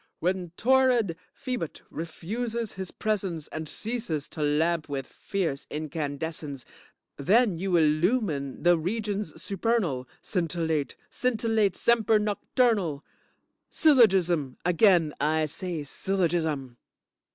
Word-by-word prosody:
When 180 0 -1
torrid 250 -7 +3 0.2
Phoebut 250 - -5
refuses 220 +8 -4
his 190 -2 -5
presence 190 -7 -2
and 155 -1 -5
ceases 220 -10 -3
to 155 - -7
lamp 155 +2 +1
with 135 -2 -3
fierce 165 -6 -3
incandescence, 150 -2 -4 0.5
then 195 - +3
you 185 -1 +1
illumine 155 - +1
the 175 -1 +5
regions 205 -1 -3
supernal, 180 - -1 0.2
scintillate, 165 -5 -1 0.2
scintillate, 225 -5 +1
semper 225 -2 +3
noctornal. 210 - +1 0.7
Syllogism, 185 - +4
again 175 -3 +4
I 155 +1 +2
say 170 0 -3
syllogism. 160 -6 -1
175 Hz, 95 wpm, -27 LUFS, 155-215 Hz, 0.7 s, the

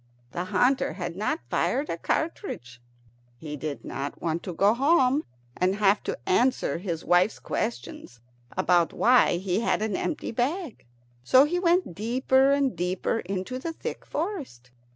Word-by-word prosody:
The 175 +6 -3
hunter 250 0 +2
had 175 -1 -5
not 205 +3 -1
fired 250 - 0
a - - -2
cartridge. 165 - -3 0.6
He 150 +2 -7
did 150 0 -5
not 140 +1 -5
want 165 0 -2
to 180 - -6
go 200 +5 +4
home 275 +1 +3 0.3
and 185 +2 +1
have 205 0 +3
to - - -2
answer 240 - +2
his 170 -3 -4
wife's 180 +4 +3
questions 120 0 -5 0.4
about 175 -2 +3
why 245 -7 +4
he 185 +1 -1
had 225 -2 0
an 215 -3 -1
empty 315 - -3
bag, 265 - -3 0.4
so 255 - +6
he 350 +4 -1
went 355 - +2
deeper 260 +6 +2
and 280 -5 +1
deeper 180 +6 -1
into 195 +7 -4
the 330 +4 -4
thick - - -6
forest. 290 - -5
205 Hz, 155 wpm, -26 LUFS, 170-265 Hz, 0.6 s, so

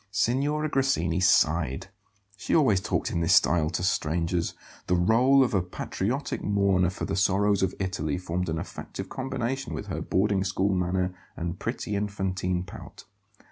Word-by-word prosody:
Signora 140 +8 0
Grassini 130 - +1
sighed. 80 -6 +2 0.5
She - - -1
always 110 - +4
talked - - -1
in 85 - -1
this 80 - +4
style 80 -3 +3
to 85 +1 -3
strangers; 85 0 0 0.3
the 90 - +2
role 120 +9 +4
of 125 - -1
a 95 - +3
patriotic 105 +8 -3
mourner 100 -3 +2
for 95 - -5
the 100 - -2
sorrows 100 +1 +2
of 95 -1 0
Italy 90 -6 -2
formed 90 0 -3
an 80 - -1
effective - - -7
combination 135 0 -3
with - - -5
her - - -4
boarding 100 0 +1
school 95 +1 0
manner 90 0 0 0.2
and 85 +1 -4
pretty 105 - -3
infantine 95 -3 -2
pout. 90 - -11
95 Hz, 155 wpm, -27 LUFS, 90-105 Hz, 0.5 s, always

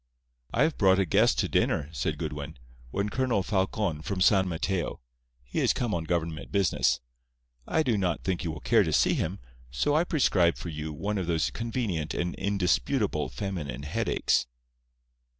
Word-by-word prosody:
"I - - +3
have 160 - 0
brought 95 -2 +5
a 95 - +2
guest 75 -6 +3
to - - +1
dinner," 75 -3 +1
said 80 - -2
Goodwin. 75 +1 -5 0.3
"One 100 +10 -1
Colonel 125 -5 0
Falcon, 95 -4 -1
from 95 +4 -3
San 95 0 +4
Mateo. 90 +1 -2 0.4
He - - -3
is - - +3
come 120 -4 -1
on 80 -3 -2
government 80 -2 -2
business. 100 -2 +2 0.7
I 160 - +2
do 115 -7 +1
not 90 -3 -1
think 95 -1 -1
you 85 - -2
will 80 - -8
care - - +4
to - - 0
see - - +4
him, 90 +5 -1 0.3
so 65 - 0
I 160 - +4
prescribe 100 - +3
for 85 - -6
you 75 0 -5
one 100 +7 -2
of 90 - -3
those 85 -2 +1
convenient 115 - -2
and 85 0 -1
indisputable 95 - 0
feminine 75 0 -4
headaches." 75 - 0
90 Hz, 170 wpm, -28 LUFS, 80-100 Hz, 0.7 s, brought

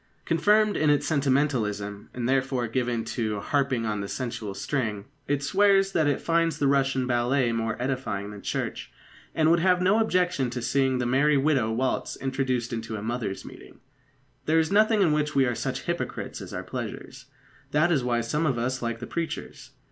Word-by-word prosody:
Confirmed 210 +5 +3
in 155 0 +2
its 145 -1 +3
sentimentalism 125 -9 0
and 120 -1 -3
therefore 130 -2 +1
given 120 -1 -1
to 110 -3 -2
"harping 135 -1 0
on 105 -2 -2
the 100 - -4
sensual 115 -4 -4
string" 110 -8 -2 0.2
it 145 0 0
swears 195 +4 +3
that 160 -5 +2
it 145 - +1
finds 165 0 +1
the 145 - 0
Russian 135 -1 +2
ballet 120 +1 +1
more 115 0 -2
edifying 125 -6 -3
than 105 -1 -9
church, - - -4 0.4
and 160 0 +4
would 170 - +4
have 180 +1 +3
no 190 +4 +3
objection 180 - +1
to 125 0 -4
seeing 135 0 +1
the 125 - -1
Merry 140 +4 +3
Widow 135 -6 +2
waltz 130 +3 -1
introduced 130 -3 -2
into 115 -1 -4
a 105 - -5
mothers' 115 -4 -3
meeting. - - -13 0.7
There 160 +1 +3
is 160 +2 +2
nothing 215 0 +4
in 165 - +3
which 150 0 0
we 135 -1 +4
are 120 - 0
such - - -3
hypocrites - - -4
as - - -8
our - - -4
pleasures. - - -7 0.4
That 155 +4 +2
is 140 -6 +2
why 120 -1 +1
some 150 +7 -1
of 130 -4 0
us 130 +2 -2
like 115 -1 -3
the - - -4
preachers. 165 +3 -5
130 Hz, 185 wpm, -26 LUFS, 120-155 Hz, 0.7 s, and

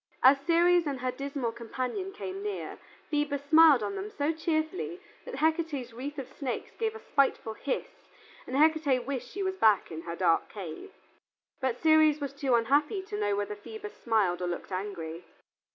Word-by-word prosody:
As 275 +2 +7
Ceres 345 0 +4
and 275 -3 -3
her 255 0 0
dismal 275 -2 -3
companion 255 - -4
came 390 -1 -6
near, 415 -1 -5 0.3
Phoebus 290 -2 0
smiled 310 -5 +7
on 200 -1 -2
them 195 +2 -4
so 290 +6 0
cheerfully 320 +2 -2 0.3
that - - -6
Hecate's 315 -6 0
wreath 280 +5 -6
of 270 -3 -5
snakes 270 -1 -5
gave 445 -1 -1
a - - -7
spiteful 275 - +1
hiss 270 +4 -2 0.6
and 265 - -2
Hecate 300 -5 +3
wished 255 -2 -4
she 395 - -4
was 380 0 -2
back 215 - +4
in 160 0 -5
her 170 0 -5
dark 170 -2 +2
cave. 200 - -7 0.7
But 260 -3 -1
Ceres 315 -1 +5
was 280 -2 -4
too 275 -3 +1
unhappy 290 - +2
to 210 - -5
know 205 -1 +1
whether 205 +1 -2
Phoebus 420 - -9
smiled 205 -7 +2
or 180 - -1
looked 175 +2 -5
angry. 180 -4 -4
275 Hz, 175 wpm, -29 LUFS, 225-320 Hz, 0.7 s, As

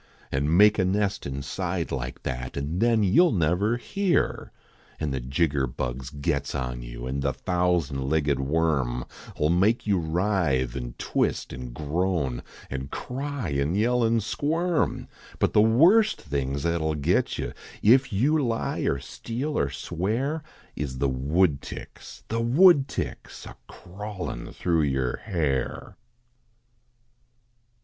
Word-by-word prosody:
An 70 +5 +1
make 105 +2 +6
a - - +4
nest 100 -2 0
inside 80 +6 -3
like 65 -1 -4
that. 60 +2 -4
An 75 +6 -2
then 115 -1 +3
you 100 - +5
ll 170 - +2
never 90 +7 +1
hear; 195 +7 0 0.5
An 75 -3 -2
the 65 - -1
jigger 70 +2 0
bugs 65 +1 -4
gets 70 0 -2
on 60 -3 -3
you, - - -7
An 65 +2 -2
the 70 -1 0
thousand 85 -6 0
legged 75 -3 +1
worm 70 -4 0 0.4
111 80 +4 +2
make 110 +5 +2
you 100 -3 +2
writhe, 80 -7 0
an - - -5
twist, - - -1
an 65 -1 -7
groan, 75 -2 -1 0.3
An 65 0 -4
cry, 135 - -4
an 70 +4 0
yell, 120 +4 +2
an 115 0 +2
squirm; 155 - 0 0.3
But - - +1
the 105 - +6
worst 170 - +5
things 70 -1 -3
at 85 0 +1
11 80 -1 -1
git - - +1
you - - -4 0.3
If 130 +4 +5
you 140 +9 +2
lie, 115 -2 -1
or 70 - +1
steal, 125 - -5
or 70 - +1
swear, 110 - -2 0.3
Is 70 -3 -4
the 70 +1 +1
woodticks 70 +4 -2
the 115 +1 -1
woodticks 140 +3 +3
A - - -10
crawlin 100 +1 -7
thro 85 -2 +1
yer 65 -4 0
hair. 80 -11 -2
85 Hz, 140 wpm, -26 LUFS, 70-110 Hz, 0.5 s, make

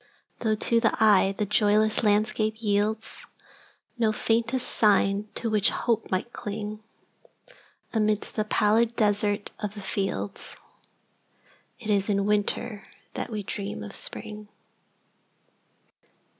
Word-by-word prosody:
Though, 220 -2 +1
to 230 +2 +2
the 225 -1 +3
eye, 200 -3 +5
the 210 - 0
joyless 210 +1 +2
landscape 215 0 +1
yieldsNo 215 0 -1 0.9
faintest 230 +4 0
sign 205 -1 +2
to 235 - -1
which 210 -3 +3
the - - +2
hope 230 -3 0
might 190 +6 -2
cling,—Amidst 215 - -6
the 215 - 0
pallid 220 +2 +2
desert 205 -2 +1
of 210 -1 -4
the 205 - -7
fields,—It 190 - -3 1.4
is 200 0 +1
in 200 -1 +1
Winter 210 +1 -1 0.3
that - - -4
we 215 -3 -4
dream 195 - -5
of 100 - -8
Spring. 210 -1 -4
210 Hz, 110 wpm, -26 LUFS, 205-220 Hz, 1.4 s, eye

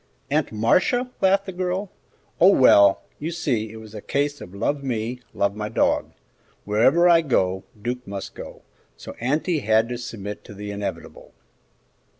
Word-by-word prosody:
"Aunt - - +1
Marcia?" 185 - +2
laughed 195 +1 +3
the 190 - -5
girl; 185 +2 -3 0.5
"oh, 185 +4 +7
well, 100 - +6 0.2
you 155 - -3
see 125 -11 -2
it - - -11
was 110 -1 -12
a 105 - -7
case 145 +4 -1
of 90 - -10
'love 140 +8 -1
me, 120 -1 -3
love 100 0 0
my 105 0 -4
dog.' - - 0 0.5
Wherever 130 +12 +4
I 170 -1 +6
go, 95 - 0
Duke 125 +3 -4
must 100 -1 -6
go, - - -10 0.3
so - - -9
auntie 150 +7 0
had 110 -1 +2
to 120 -1 -4
submit 105 -4 -7
to 105 - -11
the 105 +1 -6
inevitable." 100 0 -7
120 Hz, 160 wpm, -23 LUFS, 105-165 Hz, 0.5 s, oh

